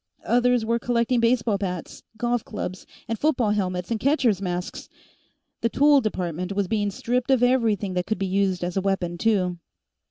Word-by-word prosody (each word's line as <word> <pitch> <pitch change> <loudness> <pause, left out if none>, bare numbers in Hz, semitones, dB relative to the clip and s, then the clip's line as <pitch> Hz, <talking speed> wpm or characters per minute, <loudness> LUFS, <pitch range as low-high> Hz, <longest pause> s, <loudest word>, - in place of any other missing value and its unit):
Others 245 -1 +2
were 230 +1 +1
collecting 240 +1 +1
baseball 230 -3 +2
bats, 180 -4 -5 0.2
golf 240 0 0
clubs, 185 -3 -6 0.2
and 225 -1 -3
football 260 -8 +2
helmets 185 -2 -2
and 225 - 0
catchers' 250 - +2
masks. 180 -1 -4 0.7
The 230 - +1
Tool 285 +2 +5
Department 180 -4 -3
was 200 -1 0
being 205 0 0
stripped 245 +5 -2
of 260 -2 +3
everything 225 -6 +2
that 180 0 -2
could 220 - -1
be 195 - -2
used 190 -1 0
as 175 0 -3
a 195 - +1
weapon, 180 -3 -1
too. 185 -5 +1
210 Hz, 170 wpm, -24 LUFS, 185-240 Hz, 0.7 s, Tool